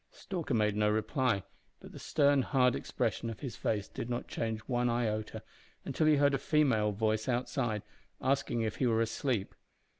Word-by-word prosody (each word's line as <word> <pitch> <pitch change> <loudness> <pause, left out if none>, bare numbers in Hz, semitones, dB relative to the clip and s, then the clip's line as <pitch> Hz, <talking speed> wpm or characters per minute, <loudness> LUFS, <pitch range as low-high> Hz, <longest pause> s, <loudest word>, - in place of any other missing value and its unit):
Stalker 170 -9 -4
made 105 -2 +2
no 105 0 +2
reply, 110 - +1 0.4
but - - -12
the - - -10
stern, 140 -1 +3
hard 125 -2 +3
expression 115 - -2
of 115 - -7
his 130 -4 -5
face 105 -2 -1
did 120 - -6
not 120 0 -3
change 110 -1 -2
one 120 +1 0
iota 110 -3 -2 0.4
until 155 - +1
he 155 - +6
heard 145 0 +3
a 135 - +1
female 130 -10 +2
voice 110 +3 0
outside 120 -3 -1 0.4
asking 135 -3 0
if 110 -2 -2
he 130 - +2
were 115 -1 +2
asleep. 115 -2 -1
120 Hz, 175 wpm, -32 LUFS, 110-135 Hz, 0.4 s, he